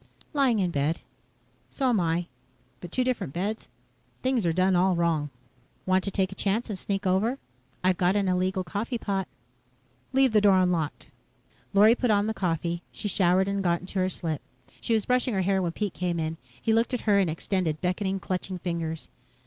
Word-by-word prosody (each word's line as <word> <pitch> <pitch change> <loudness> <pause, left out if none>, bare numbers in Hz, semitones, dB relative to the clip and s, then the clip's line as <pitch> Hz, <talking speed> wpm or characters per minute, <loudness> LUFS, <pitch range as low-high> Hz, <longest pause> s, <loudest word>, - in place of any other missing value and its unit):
"Lying 270 -6 +3
in 185 -3 +1
bed." 145 +2 0 0.7
"So 270 - -1
am 230 -4 +3
I. 170 0 0 0.5
But 175 - -9
two 255 - +1
different 225 - -2
beds. 205 +5 -3 0.5
Things 255 -7 +1
are - - +3
done 185 +2 +2
all 185 +1 +3
wrong." 165 -3 +1 0.6
"Want 185 0 +2
to - - 0
take 190 -1 0
a - - -5
chance 210 +4 -1
and 195 - -4
sneak 195 +1 -2
over? 200 +8 +2 0.5
I've 185 -1 +3
got 180 +2 +2
an 200 -2 +1
illegal 185 +1 +1
coffee 220 +6 -3
pot." 195 -4 -2 0.8
"Leave 265 -1 +4
the 210 - +5
door 200 -2 +5
unlocked." 175 -5 0 0.6
Lorry 210 +3 +6
put 245 0 0
on 205 -1 +3
the 220 - -1
coffee. 170 -3 -1
She - - -5
showered 190 -1 +3
and 200 0 -1
got 170 -1 +1
into 190 +1 -4
her 185 0 +2
slip. 160 -5 -3 0.4
She 230 - +1
was 215 - 0
brushing 250 -2 +1
her 190 - +1
hair 190 +1 +2
when 175 -2 -1
Pete 205 +2 -3
came 175 -2 -2
in. 160 0 -2 0.2
He 225 - +1
looked 230 +3 +2
at 245 - -3
her 205 -2 +3
and 190 -4 +2
extended 165 -1 -1
beckoning, 190 +2 -1
clutching 185 +1 -3
fingers. 165 -3 -4
190 Hz, 195 wpm, -27 LUFS, 175-210 Hz, 0.8 s, Lorry